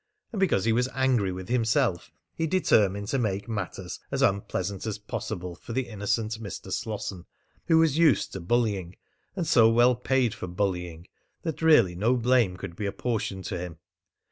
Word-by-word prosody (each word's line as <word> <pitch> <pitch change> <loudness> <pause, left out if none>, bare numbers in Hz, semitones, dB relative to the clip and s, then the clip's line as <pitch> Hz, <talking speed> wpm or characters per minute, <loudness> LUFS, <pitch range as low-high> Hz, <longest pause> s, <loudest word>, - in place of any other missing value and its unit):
And 210 - -3
because 170 - +2
he 115 - +3
was 125 +3 +1
angry 130 -7 +2
with 90 0 -6
himself 115 - +1 0.2
he 160 - -1
determined 100 - +2
to 135 - 0
make 100 -3 -1
matters 95 -4 -5
as - - 0
unpleasant 100 +1 -1
as 110 - -2
possible 90 -3 -5
for 115 - -9
the 130 +1 -1
innocent 110 +1 -2
Mr. 100 -5 -7
Slosson, 100 -5 -4 0.4
who 165 -2 +5
was 160 -2 +3
used 155 -10 +3
to 95 - -4
bullying, 95 -2 0 0.4
and 180 -3 -1
so 120 -8 +5
well 120 +2 +5
paid 125 -1 +1
for - - -6
bullying, 90 -2 -3 0.4
that 160 -2 -4
really 150 - +5
no 110 +8 +1
blame 120 -6 +2
could 95 -2 -7
be 100 +2 -3
apportioned 100 -3 -3
to 90 - -3
him. 85 -2 -6
110 Hz, 170 wpm, -27 LUFS, 95-125 Hz, 0.4 s, who